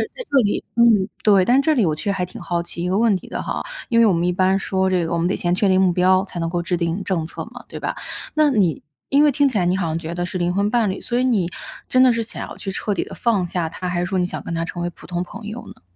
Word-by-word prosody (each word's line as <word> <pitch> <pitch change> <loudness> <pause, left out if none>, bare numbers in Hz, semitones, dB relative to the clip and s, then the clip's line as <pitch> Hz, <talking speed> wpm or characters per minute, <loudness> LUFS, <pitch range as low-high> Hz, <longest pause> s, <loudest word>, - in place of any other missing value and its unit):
在 - - -6
这 280 - +4
里 205 - 0
嗯， 225 -4 +5
对， 200 -3 +5
但 250 +8 +4
这 315 +1 +2
里 235 -9 +2
我 155 - +1
确 150 - -5
实 - - +2
还 180 -2 -1
挺 180 - -11
好 170 -1 -2
奇 170 - -7
一 180 - -1
个 190 - +1
问 225 -1 +4
题 - - -13
的 - - -4
哈， - - -3 0.3
因 230 -2 +3
为 230 - +7
我 205 - +4
们 170 0 0
一 180 - +2
般 185 +2 +2
说 190 -1 0
这 180 -2 +1
个 165 - -4
我 - - +1
们 170 +1 +1
得 190 - 0
先 175 0 0
确 200 +3 +2
定 190 0 +4
目 185 -2 +4
标， 185 +2 +3
才 185 -3 -7
能 165 0 -1
够 175 0 -1
制 175 +1 -1
定 170 +3 -2
政 180 -4 -1
策 - - -6
嘛， - - -11
对 - - -8
吧？ - - -3 0.4
那 305 -1 +4
你 195 - +1 0.3
因 285 +2 +5
为 295 - +5
听 285 +1 +3
起 235 - -2
来 180 - +1
你 180 - +2
好 180 - -1
像 160 +1 -1
觉 165 0 -5
得 175 - -2
是 180 +1 -4
灵 175 0 +1
魂 200 +2 +1
伴 230 -3 +2
侣， 190 - -3
所 240 - -2
以 255 - +2
你 205 -9 +1 0.4
真 255 - +3
的 255 -1 +6
是 230 - 0
想 220 - -6
要 - - -10
去 195 - -5
彻 205 +2 -2
底 - - 0
地 - - -11
放 205 -7 +1
下 170 -1 -2
他， 180 +2 -6
还 175 -1 -1
是 175 - 0
说 190 0 -1
你 180 - +2
想 180 - -5
跟 - - -6
他 165 - -1
成 175 +1 -6
为 175 - -1
普 - - -16
通 175 0 -2
朋 215 +4 -10
友 220 +3 -7
呢？ - - -13
185 Hz, 355 characters per minute, -21 LUFS, 175-220 Hz, 0.4 s, 为